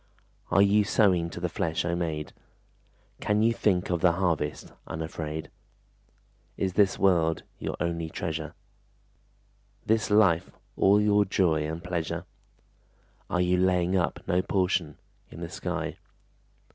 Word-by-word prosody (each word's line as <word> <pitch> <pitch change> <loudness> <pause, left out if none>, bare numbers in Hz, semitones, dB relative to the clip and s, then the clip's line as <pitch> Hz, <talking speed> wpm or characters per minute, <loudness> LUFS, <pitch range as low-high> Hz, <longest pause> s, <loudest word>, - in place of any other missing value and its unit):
Are 100 - +5
you 105 +1 +4
sowing 95 -5 +2
to 85 - -7
the 90 - -1
flesh, 80 0 -2
O 85 0 0
maid? 80 -3 -3 0.9
Can 105 +1 +1
you 115 +1 +4
think 95 -6 +1
of 85 -2 0
the 90 -2 +4
harvest 80 -6 -1 0.2
unafraid? 80 -1 -5 1.1
Is 95 -2 -1
this 100 0 +3
world 85 -4 +2 0.2
your - - -3
only 85 -1 -2
treasure? 80 -2 -4 1.3
This 110 -1 +1
life 100 -6 +4 0.3
all 100 +2 +4
your 105 0 +4
joy 85 -6 +1
and 80 +2 -5
pleasure? 85 -3 -3 1.0
Are 90 - +1
you 90 0 +2
laying 90 0 +2
up 90 -2 0
no 90 +1 +2
portion 90 -6 0 0.3
In - - -11
the - - -5
sky? - - -4
90 Hz, 135 wpm, -27 LUFS, 80-95 Hz, 1.3 s, Are